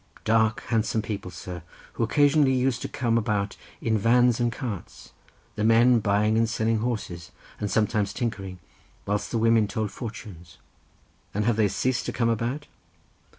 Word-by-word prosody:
"Dark, 110 0 +2
handsome 110 -1 +1
people, 100 -3 -5
sir, 90 -1 -8 0.3
who - - -5
occasionally 145 +3 +3
used 125 -1 0
to - - -3
come 115 -2 0
about 105 -2 -1 0.3
in 110 -1 +1
vans 120 +2 +4
and 120 -1 +1
carts, 115 - -7 0.4
the 105 - -3
men 115 +2 +5
buying 105 +2 +2
and 115 0 +2
selling 110 0 0
horses, 105 -8 -4 0.3
and 105 - -2
sometimes 105 -1 +1
tinkering, 95 -6 -4 0.5
whilst 105 0 -1
the 115 - -1
women 115 -1 +3
told 105 0 -3
fortunes." 100 -7 -9 0.8
"And 105 0 0
they 110 -1 +2
have 100 - 0
ceased 125 +5 -1
to - - -1
come 115 -2 0
about?" 120 +6 -2
110 Hz, 155 wpm, -26 LUFS, 105-120 Hz, 0.8 s, men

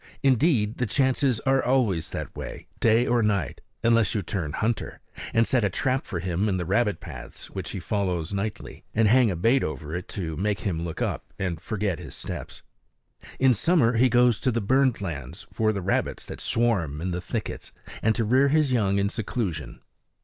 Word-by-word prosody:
Indeed 130 -5 +3
the 125 - +1
chances 130 0 +2
are 135 0 +2
always 115 -11 +1
that - - -6
way, - - -7
day 115 +1 +4
or 120 -1 +2
night, 100 - 0 0.2
unless 115 -4 +3
you 105 - 0
turn 85 -4 -3
hunter 110 +1 -2 0.3
and 115 0 +3
set 125 -1 +1
a 100 - +3
trap 130 +7 -1
for 90 - -3
him 90 +4 0
in 95 - 0
the 90 - -2
rabbit 100 0 +1
paths - - -10
which - - -5
he - - -4
follows 90 -4 -2
nightly, 100 +2 -4
and 110 0 +4
hang 120 +1 +5
a 95 - -1
bait 115 +10 +3
over 75 +1 -4
it 90 - -5
to 80 -5 -4
make 100 0 -1
him 85 -5 -2
look 85 -2 -3
up - - -4
and 90 -5 -3
forget 100 -6 -2
his - - -8
steps. - - -6 0.7
In 130 -1 +5
summer 125 - +3
he 130 +2 +5
goes 120 -2 +4
to 130 - +1
the 115 - 0
burned 130 +2 +2
lands 70 -9 -6
for 110 -1 +2
the 100 -3 -4
rabbits - - -1
that - - -8
swarm 100 -11 +1
in 90 +3 -2
the 90 +1 -3
thickets, - - -5 0.3
and 110 0 +2
to 115 - 0
rear 130 +5 +4
his 150 -1 +3
young 100 -5 +2
in 100 0 +2
seclusion. 95 - -3
105 Hz, 195 wpm, -26 LUFS, 90-120 Hz, 0.7 s, hang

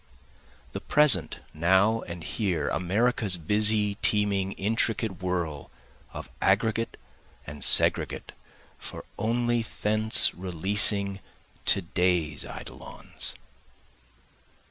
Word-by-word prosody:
The - - -7
present 150 -4 +2
now 95 +7 +2
and 85 -1 -9
here, 90 -9 -2
America's 105 +1 +1
busy, 105 +3 +1
teeming, 100 -2 0
intricate 110 -1 -2
whirl, 85 -6 -4 0.4
Of - - -9
aggregate 110 +3 0 0.5
and 75 -1 -9
segregate - - +2 0.5
for - - -10
only 120 +1 -1
thence 110 0 +3
releasing, 100 +2 +1 0.5
To 100 - +2
day's 85 -3 -1
eidolons. - - -5
100 Hz, 85 wpm, -26 LUFS, 90-110 Hz, 0.5 s, thence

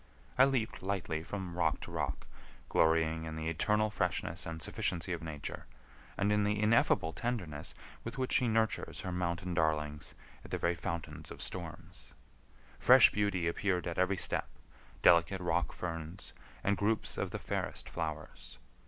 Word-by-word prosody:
I 130 - +7
leaped 130 -5 0
lightly 95 -5 -2
from 90 0 -5
rock 80 -3 +1
to - - -7
rock, - - -2 0.4
glorying 80 0 +3
in 80 -1 -5
the 80 0 -2
eternal 105 +6 +2
freshness 85 -3 -1
and 80 -1 -5
sufficiency 90 +3 -1
of 85 - -4
Nature, 75 -3 -6 0.5
and 100 +1 +2
in 105 0 +3
the 105 0 +1
ineffable 105 -7 +3
tenderness 90 -12 -3 0.3
with 115 +2 -6
which 130 -1 -1
she 125 - +4
nurtures 110 0 0
her 90 - -4
mountain 90 0 -1
darlings 75 -3 0 0.3
in - - -11
the - - -1
very 85 - +1
fountains 85 -1 -5
of - - -9
storms. 85 0 -5 0.6
Fresh - - +8
beauty 100 -5 +1
appeared 90 +1 0
at 85 0 -2
every 95 +1 +2
step, - - 0 0.6
delicate 85 +3 +6
rock 85 -1 0
ferns, 85 +1 -5 0.3
and 100 0 +2
groups 105 +3 +1
of - - -1
the - - -4
fairest - - -3
flowers. 75 -6 -5
90 Hz, 155 wpm, -33 LUFS, 80-100 Hz, 0.6 s, Fresh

